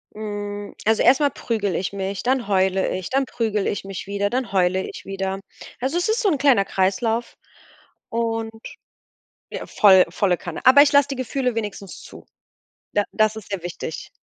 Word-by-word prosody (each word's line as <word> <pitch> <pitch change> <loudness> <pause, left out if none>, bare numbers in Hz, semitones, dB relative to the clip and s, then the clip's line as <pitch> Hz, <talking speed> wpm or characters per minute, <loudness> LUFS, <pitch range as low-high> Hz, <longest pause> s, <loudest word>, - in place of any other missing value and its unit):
Mm, 205 -1 -5
also, 220 0 +3
erst 260 +3 +6
mal 290 -1 +3
prügel 205 -8 -2
ich 190 +3 -2
mich, 195 0 -4
dann 255 -2 0
heule 190 -1 +2
ich, 185 - -6
dann 270 +1 +2
prügel 220 -5 -1
ich 200 - -2
mich 195 0 -7
wieder, 200 0 -1
dann 255 -2 -2
heule 185 0 +2
ich - - -10
wieder. 195 0 -3 0.4
Also, 270 +7 -1
es 355 +5 0
ist 465 +3 +1
so 410 - +3
'n 295 - 0
kleiner 255 -9 +4
Kreislauf 220 +5 -1 0.7
und 225 -1 -2 1.0
ja - - -6
voll, 190 -3 +6
volle 180 -1 +1
Kanne. 175 -3 -7
Aber 280 +2 +9
ich 290 - +3
lass 285 0 +5
die 275 - -4
Gefühle 255 -1 -2
wenigstens 205 -3 -5
zu. - - -13 0.7
Da 205 0 +2
das 215 0 +2
ist 210 -2 -10
sehr 195 -4 -3
wichtig. 170 -3 -6
210 Hz, 180 wpm, -22 LUFS, 195-250 Hz, 1.0 s, Aber